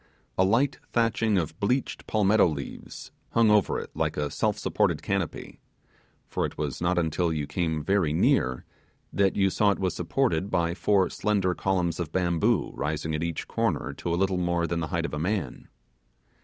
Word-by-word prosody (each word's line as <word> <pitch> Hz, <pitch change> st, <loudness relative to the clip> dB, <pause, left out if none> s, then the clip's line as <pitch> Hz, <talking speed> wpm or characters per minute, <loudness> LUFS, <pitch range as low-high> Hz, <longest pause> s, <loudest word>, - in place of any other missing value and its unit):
A 95 Hz, -, +3 dB
light 115 Hz, +9 st, +2 dB
thatching 115 Hz, -2 st, +2 dB
of 80 Hz, -1 st, -2 dB
bleached 125 Hz, +6 st, -1 dB
palmetto 105 Hz, -1 st, +4 dB
leaves 70 Hz, -4 st, -7 dB, 0.2 s
hung 115 Hz, -2 st, +4 dB
over 105 Hz, -2 st, +3 dB
it -, -, -8 dB
like -, -, -1 dB
a 75 Hz, -1 st, -1 dB
self -, -, 0 dB
supported -, -, 0 dB
canopy; 100 Hz, -4 st, -3 dB, 0.7 s
for -, -, -2 dB
it -, -, -4 dB
was -, -, -3 dB
not 90 Hz, +1 st, +1 dB
until 85 Hz, 0 st, +1 dB
you 75 Hz, -2 st, -2 dB
came 80 Hz, -1 st, -2 dB
very 95 Hz, -2 st, +2 dB
near 65 Hz, -4 st, +2 dB, 0.5 s
that 100 Hz, -1 st, +2 dB
you 95 Hz, -1 st, +2 dB
saw 105 Hz, +2 st, +3 dB
it 100 Hz, -, +1 dB
was 95 Hz, -1 st, -1 dB
supported 95 Hz, -1 st, 0 dB
by 85 Hz, -2 st, +1 dB
four 95 Hz, +2 st, +2 dB
slender 100 Hz, -4 st, +1 dB
columns 90 Hz, -3 st, -1 dB
of 85 Hz, -3 st, -3 dB
bamboo 85 Hz, -3 st, +1 dB
rising 75 Hz, +2 st, -2 dB
at 75 Hz, -, -1 dB
each 85 Hz, -1 st, -3 dB
corner -, -, -1 dB
to 85 Hz, -, -4 dB
a 85 Hz, -, +1 dB
little 95 Hz, 0 st, +1 dB
more 85 Hz, -1 st, 0 dB
than 85 Hz, 0 st, -2 dB
the 80 Hz, -, -2 dB
height 85 Hz, -1 st, -1 dB
of -, -, -5 dB
a 75 Hz, -, -2 dB
man. 95 Hz, +3 st, -2 dB
90 Hz, 185 wpm, -27 LUFS, 80-100 Hz, 0.7 s, palmetto